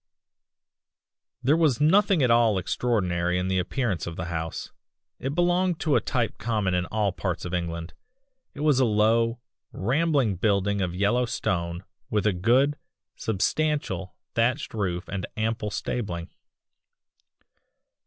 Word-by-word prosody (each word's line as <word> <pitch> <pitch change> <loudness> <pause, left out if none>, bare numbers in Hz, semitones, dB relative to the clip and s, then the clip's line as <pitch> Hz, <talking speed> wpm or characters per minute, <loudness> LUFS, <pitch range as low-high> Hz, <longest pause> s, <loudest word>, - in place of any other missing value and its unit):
"There 140 +5 +4
was 155 -7 +2
nothing 185 +1 +4
at 125 - +4
all 115 -3 +4
extraordinary 90 -4 0
in 90 +1 -1
the 95 0 +1
appearance 95 -1 -1
of 85 - -5
the 80 - -4
house; 80 0 -4 0.5
it 135 +3 -3
belonged 175 0 +2
to 155 -4 +2
a - - +4
type 120 -3 -1
common 105 -4 0
in 90 0 0
all 105 -2 0
parts 90 -1 -3
of 90 - -5
England. 85 -1 -3 0.6
It 145 - -6
was 150 -3 +3
a 130 - +5
low, 115 +2 +2 0.3
rambling 135 - +1
building 100 0 +1
of 90 -2 -2
yellow 105 +6 +2
stone 85 -4 -2 0.3
with 105 -2 0
a 105 - +3
good, 125 +10 +3 0.4
substantial, 110 - -1 0.2
thatched 125 +5 0
roof 90 -5 -2
and 100 -3 -4
ample 110 0 -1
stabling. 90 -5 -4
110 Hz, 135 wpm, -26 LUFS, 90-130 Hz, 0.6 s, a